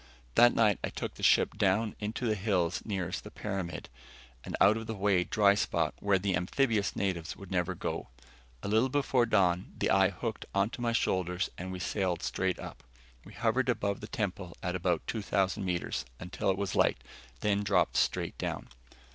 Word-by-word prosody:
That 120 - +6
night 105 -4 +3
I - - -1
took - - -5
the - - -12
ship - - +3
down 105 +3 +2
into 110 +3 -3
the 110 - +2
hills 90 -4 0
nearest 95 -4 -3
the 105 - -9
pyramid, 95 -5 -4 0.6
an - - -4
out 105 - +6
of 115 0 -5
the 110 - -3
way 100 -2 +2
dry 100 +1 +4
spot 85 -5 0
where 100 -1 +3
the 95 0 0
amphibious 105 +3 +1
natives 85 -4 -2
would 100 -2 -11
never 90 0 0
go. - - -4 0.6
A - - -3
little 110 +5 +3
before 130 -3 +2
dawn, 95 -5 +2
the - - +1
eye 95 -1 +5
hooked 110 +4 -5
onto 100 +5 0
my 120 -1 +1
shoulders 90 -5 0
and 95 +1 -6
we 95 - -4
sailed 90 0 -1
straight - - -1
up. - - -9 0.4
We - - -12
hovered 120 +3 +1
above 100 -4 0
the 105 - -6
temple 100 -7 -4
at 90 +1 -1
about 90 -2 0
2,000 100 -3 0
meters, 90 -2 -2 0.2
until 90 +2 -2
it 95 - +2
was 100 -2 -2
light, - - +3 0.4
then 100 -1 +2
dropped 95 -4 +2
straight - - 0
down. - - -4
100 Hz, 185 wpm, -30 LUFS, 90-110 Hz, 0.6 s, That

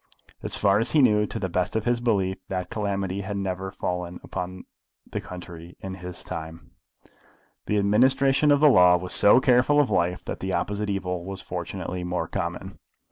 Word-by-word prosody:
As - - -4
far 100 0 +3
as 115 +2 -1
he 155 - +5
knew, 105 -3 +3
to - - -6
the 95 - -2
best 90 +2 -2
of 110 - -1
his 120 0 +1
belief, 95 -6 0
that 90 -1 -4
calamity 100 -2 -2
had 100 +1 -4
never 95 -1 -3
fallen 90 -2 -4
upon 90 +1 -6 0.4
the - - -5
country 85 -1 -10
in 95 -1 -6
his 90 -1 -7
time. 80 -1 -8 1.0
The 105 - +1
administration 130 +8 +3
of 145 0 +4
the 155 - +7
law 90 -7 +6
was 90 +1 -4
so 105 +4 +6
careful 130 +3 +4
of 145 - +2
life 90 +1 0
that - - -5
the 95 0 -3
opposite 105 0 -2
evil 90 -3 -2
was 95 +1 -7
fortunately 90 0 -5
more 90 -2 -2
common. - - -5
95 Hz, 185 wpm, -25 LUFS, 90-105 Hz, 1.0 s, the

